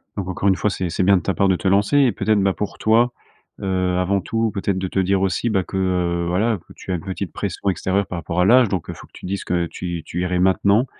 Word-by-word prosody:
Donc 95 -2 -4
encore 95 +2 -1
une 95 - +4
fois 105 - 0
c'est 95 -3 -3
c'est 90 +3 -1
bien 95 +1 +5
de - - -2
ta 95 - 0
part 100 0 +2
de 90 - +2
te 95 - -3
lancer. 100 +8 +3
Et 130 -4 +4
peut - - -6
être, 110 - +4
bah, 95 -1 +2
pour 105 - -5
toi, 115 +3 +3 0.5
heu, 90 -1 0
avant 95 +2 +1
tout, 115 +3 -1
peut-être 100 -1 -2
de 95 0 -2
te 95 - -2
dire 95 +1 +1
aussi, 95 +5 0
bah, 95 -3 +1
que, 95 - -9
heu, 90 -2 0
voilà, 105 +5 +1
que - - -12
tu - - -7
as - - +1
une 85 - -4
petite 95 -1 -5
pression 100 0 -2
extérieure 95 +2 0
par 90 - -4
rapport 85 +2 -3
à 90 - +4
l'âge, 120 +1 +5
donc 95 -5 -3
heu, - - -3
il - - -13
faut - - -13
que - - -38
tu - - -11
dises 95 +1 -3
que 85 -1 0
tu 85 -1 -5
tu 90 - -4
irais 90 0 0
maintenant, 100 +5 +3
95 Hz, 295 wpm, -21 LUFS, 90-100 Hz, 0.5 s, bien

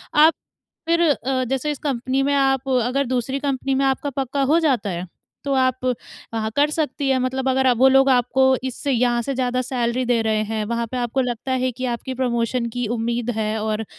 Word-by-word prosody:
आप 310 +2 +7 0.5
फिर 335 0 +2
अ, 260 -1 -1
जैसे 270 +4 -1
इस 290 - -6
कंपनी 265 -1 -1
में 285 +1 +1
आप 270 -1 +1
अगर 275 +3 0
दूसरी 260 +2 -1
कंपनी 275 -1 -1
में 275 +1 +2
आपका 270 +2 0
पक्का 270 +1 -2
हो 310 +5 +3
जाता 260 -10 +1
है, 175 0 -4 0.4
तो 280 - 0
आप, 255 -1 +1 0.5
वहाँ 220 -1 -1
कर 290 +1 +3
सकती 290 -3 -1
है 260 -1 +2
मतलब 260 +1 -1
अगर 260 -1 +3
वो 265 +3 +6
लोग 270 +1 +5
आपको 255 +1 +3 0.2
इससे 260 +2 -3
यहाँ 240 -1 +2
से 275 - -2
ज़्यादा 255 0 0
सैलरी 245 0 -1
दे 240 -2 +2
रहे 220 -1 +1
हैं, 215 0 -3
वहाँ 235 +1 -2
पे 255 - -3
आपको 245 +2 0
लगता 245 +1 -3
है 255 0 0
कि 255 +2 -4
आपकी 260 +2 -5
प्रमोशन 240 -1 -1
की 245 -1 -2
उम्मीद 235 +1 -2
है 215 0 -1
और 220 0 -2
255 Hz, 205 wpm, -22 LUFS, 235-270 Hz, 0.5 s, आप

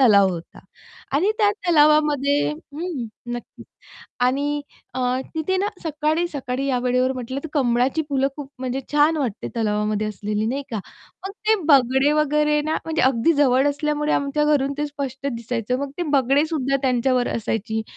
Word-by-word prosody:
तलाव 200 -6 +6
होता 170 -2 -7 0.6
आणि 380 +8 +2
त्या 420 -2 +4 0.2
तलावामध्ये 295 -3 +4
हं. 305 -2 -6 0.3
नक्कीच. 240 - -9 0.6
आणि 285 +3 +1 0.3
अ, - - -3 0.4
तिथे 320 +4 0
ना 395 +2 0 0.2
सकाळी-सकाळी 300 -4 -1
या 255 -2 +1
वेळेवर 250 +1 +1
म्हटलं, 255 +1 -5
तर - - -4
कमळाची 255 +2 +1
फुलं 275 -1 +1
खूप 290 -3 -7
म्हणजे 260 +1 -3
छान 300 +2 +4
वाटते 245 -8 -3
तलावामध्ये 210 -1 0
असलेली, 210 +1 -2
नाही 275 +4 -2
का. 225 - -2 0.5
मग - - -5 0.2
ते 440 - +6
बगळे 265 +1 +5
वगैरे 300 0 +2
ना, 310 +1 -1
म्हणजे 320 0 -1
अगदी 260 +4 +3
जवळ 275 -1 +3
असल्यामुळे 300 +1 -1
आमच्या 290 +1 +1
घरून 275 0 -1
ते 295 - 0
स्पष्ट 280 -2 -5
दिसायचं. 235 -1 -2
मग 280 0 -3
ते - - 0 0.2
बगळेसुद्धा 275 +1 +1
त्यांच्यावर 255 -1 +1
असायची. 220 0 -2
275 Hz, 150 wpm, -22 LUFS, 245-300 Hz, 0.6 s, तलाव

